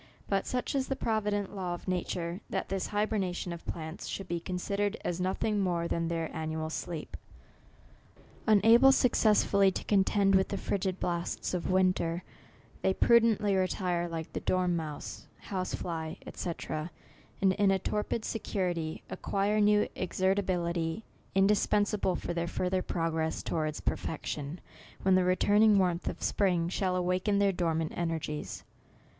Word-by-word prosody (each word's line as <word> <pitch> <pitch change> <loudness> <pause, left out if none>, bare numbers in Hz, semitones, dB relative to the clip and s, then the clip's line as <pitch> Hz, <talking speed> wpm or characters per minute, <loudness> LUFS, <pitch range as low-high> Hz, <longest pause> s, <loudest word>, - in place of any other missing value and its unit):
But 195 -1 0
such 250 -1 -2
is 270 -2 0
the 270 - -1
provi 220 -4 0
dent 205 -1 -2
law 180 -2 -2
of 175 - -13
nature, 180 0 -2
that 190 - -2
this 195 0 -1
hybernation 205 -4 -1
of 170 - -10
plants 160 0 -5
should 195 - -5
be 175 -1 -2
considered 200 +4 -2
as 175 +1 -1
nothing 200 +3 0
more 175 -3 0
than 170 0 -1
their 165 -1 -3
annual 160 0 -3
sleep. 165 -1 -5 1.3
Unable 225 +5 +7
successfully 210 -6 +4
to 190 - -4
con 200 -2 +3
end 195 -1 +4
with 190 0 +4
the 200 - -3
frigid 190 -2 -2
blasts 170 +1 -2
of 180 - -2
winter, 185 -2 +2 0.6
they 190 - +2
prudently 225 -4 +4
retire, 180 -2 0
like 165 -1 -5
the - - -2
dormouse, 170 -5 -2
house 185 -2 -3
fly, 160 -1 -4 0.2
&c. 175 - -3 0.9
and 190 -1 +4
in 200 0 +3
a 195 - +4
torpid 210 +3 -2
security, 175 -7 -2
ac - - -7
quire 205 +2 +1
new 210 0 +4
exertability, 180 -2 0 0.3
indispensable 205 0 +2
for 175 - -3
theii 170 0 -2
further 185 +1 0
progress 165 -2 -1
towards 155 -2 -2
perfection, 150 +1 -3 0.4
when 190 - +4
the 185 0 +5
returning 205 +3 +4
warmth 180 -2 +1
of - - -7
spring 175 -4 +1
shall 185 0 0
awaken 185 +3 +1
their 200 -1 +4
dormant 165 -3 -1
energies. 160 -3 -3
185 Hz, 145 wpm, -30 LUFS, 170-200 Hz, 1.3 s, Unable